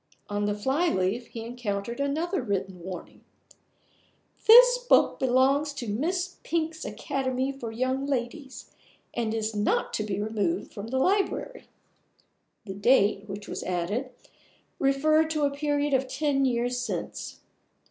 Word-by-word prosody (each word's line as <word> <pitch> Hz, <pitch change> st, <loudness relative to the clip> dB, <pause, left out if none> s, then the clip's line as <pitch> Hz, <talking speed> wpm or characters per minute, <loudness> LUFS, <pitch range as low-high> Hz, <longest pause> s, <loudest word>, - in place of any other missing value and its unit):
On 205 Hz, 0 st, -1 dB
the 205 Hz, -, 0 dB
fly 265 Hz, +11 st, +1 dB
leaf 195 Hz, +4 st, -1 dB
he 225 Hz, -1 st, -7 dB
encountered 235 Hz, -1 st, -4 dB
another 305 Hz, +5 st, -1 dB
written 195 Hz, -5 st, -3 dB
warning: 180 Hz, 0 st, -8 dB, 1.2 s
"This -, -, +9 dB
book -, -, +3 dB
belongs 270 Hz, +3 st, +2 dB
to 260 Hz, -4 st, -6 dB
Miss 350 Hz, -, -2 dB
Pink's 320 Hz, -1 st, -2 dB
Academy 260 Hz, 0 st, -2 dB
for 245 Hz, -5 st, -7 dB
Young 260 Hz, +4 st, -1 dB
Ladies, 265 Hz, +1 st, -4 dB, 0.4 s
and 230 Hz, -2 st, -1 dB
is 220 Hz, -1 st, -2 dB
not 205 Hz, 0 st, 0 dB
to 215 Hz, -, -1 dB
be 205 Hz, -2 st, -3 dB
removed 220 Hz, -, -2 dB
from 205 Hz, 0 st, -6 dB
the 260 Hz, +3 st, -2 dB
library." 400 Hz, -, 0 dB, 1.0 s
The 195 Hz, -, -5 dB
date, 205 Hz, -1 st, +3 dB
which 205 Hz, +1 st, -7 dB
was -, -, -5 dB
added, 185 Hz, +9 st, -2 dB, 0.7 s
referred 310 Hz, +3 st, +3 dB
to 305 Hz, -2 st, -1 dB
a 285 Hz, -, +2 dB
period 290 Hz, 0 st, 0 dB
of 265 Hz, 0 st, +2 dB
ten 275 Hz, 0 st, +1 dB
years 245 Hz, 0 st, 0 dB
since. 245 Hz, -, -5 dB
260 Hz, 135 wpm, -27 LUFS, 215-290 Hz, 1.2 s, This